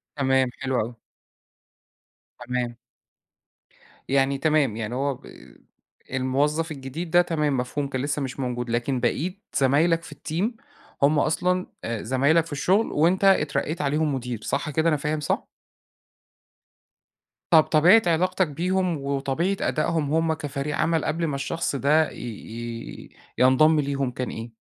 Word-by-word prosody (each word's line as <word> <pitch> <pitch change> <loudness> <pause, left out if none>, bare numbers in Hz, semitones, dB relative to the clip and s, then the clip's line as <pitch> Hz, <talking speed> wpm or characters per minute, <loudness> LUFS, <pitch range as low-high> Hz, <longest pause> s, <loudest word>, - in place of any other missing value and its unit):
تمام، 130 -2 +2
حلو 130 -1 -1
أوي. 115 +1 -6 1.5
تمام. 125 -1 -2 1.3
يعني 135 0 +2
تمام، 150 -6 +2
يعني 115 +2 -4
هو 140 +1 0
ب - - -21 0.9
الموظّف 145 +5 0
الجديد 150 +5 -6
ده 175 0 +6
تمام، 150 -5 0
مفهوم، 140 +3 -2
كان 130 -2 -3
لسّه 145 0 -2
مش 135 0 -5
موجود 120 -2 -3
لكن 120 +2 0
بقِيت 175 - -1 0.2
زمايلك 160 +5 +3
في 150 - -10
الTeam 205 - -3 0.4
هُم 145 +1 +4
أصلًا 180 +4 +1 0.2
آآ، 115 -2 -3
زمايلك 140 +7 +2
في 165 - -12
الشغل 185 +10 +1
وأنت 175 +6 +2
اترقّيت 155 -3 +2
عليهم 150 +1 0
مدير، 125 -3 -5
صح 145 +3 -2
كده، 160 +3 +1
أنا 150 - +2
فاهم 150 +1 -2
صح؟ 145 - -2 2.0
طب 160 -2 +8
طبيعة 175 +8 +5
علاقتك 180 +2 +2
بيهم، 180 +2 -1
وطبيعة 140 +7 -1
أدائهم 155 -2 0
هم 165 0 +2
كفريق 145 -1 -4
عَمَل 165 -2 +1
قبل 165 +1 -1
ما 140 - -2
الشخص 140 +2 -2
ده 150 +3 +2
ي - - -12
ي 115 0 -7 0.3
ينضم 150 +5 +5
ليهم 140 -2 -1
كان 125 +1 -4
إيه؟ 115 +1 -7
145 Hz, 140 wpm, -24 LUFS, 130-165 Hz, 2.0 s, طب